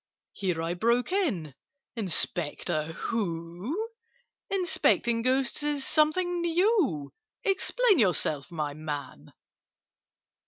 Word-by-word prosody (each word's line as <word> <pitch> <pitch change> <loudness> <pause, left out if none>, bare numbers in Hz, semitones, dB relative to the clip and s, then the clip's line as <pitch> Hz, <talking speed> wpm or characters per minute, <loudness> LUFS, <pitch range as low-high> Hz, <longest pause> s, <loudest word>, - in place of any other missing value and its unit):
Here 180 -4 -2
I 165 +1 -1
broke 235 - +1
in—"Inspector 180 - -1
who? 195 - -3 0.6
Inspecting 320 -10 +2
Ghosts 260 +2 +1
is 295 -2 0
something 345 +3 +2
new! 340 - +1 0.3
Explain 410 - +3
yourself, 170 - +1
my 150 -3 -3
man!" 145 -3 -6
235 Hz, 80 wpm, -28 LUFS, -, 0.6 s, Explain